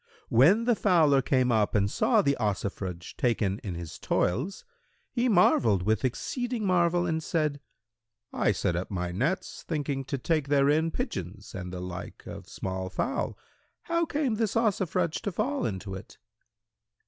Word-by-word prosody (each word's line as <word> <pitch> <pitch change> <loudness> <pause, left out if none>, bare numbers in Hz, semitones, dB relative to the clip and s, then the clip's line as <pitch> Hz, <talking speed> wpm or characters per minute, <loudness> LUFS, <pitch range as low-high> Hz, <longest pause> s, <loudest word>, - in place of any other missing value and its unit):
When 165 - +5
the 240 0 +3
fowler 170 -9 +4
came 130 -1 +2
up 110 -2 +2
and 100 -1 +3
saw - - +2
the 140 0 +2
Ossifrage 95 -4 -3
taken 105 -5 +1
in 95 -4 -5
his 85 -2 -7
toils 140 - -1 0.5
he 245 +1 +1
marvelled 115 - +4
with 110 +1 +1
exceeding 235 - -2
marvel 175 -1 +3
and 160 -2 -1
said, 155 -3 -1 0.7
'I - - +2
set 90 -2 0
up 90 +2 -3
my 90 -3 -2
nets, 140 - -2
thinking 145 -4 -2
to 140 +1 -2
take 150 +2 0
therein 145 +3 +3
pigeons 100 - -5
and 90 -1 -6
the 90 - -5
like 90 -1 -7
of - - -9
small 95 0 -4
fowl; 255 - -2 0.5
how 335 -1 0
came 285 -8 0
this 225 -2 0
Ossifrage 185 -7 +1
to 205 - -2
fall 260 +10 -1
into 95 -2 -5
it?' 95 - -9
140 Hz, 155 wpm, -28 LUFS, -, 0.7 s, When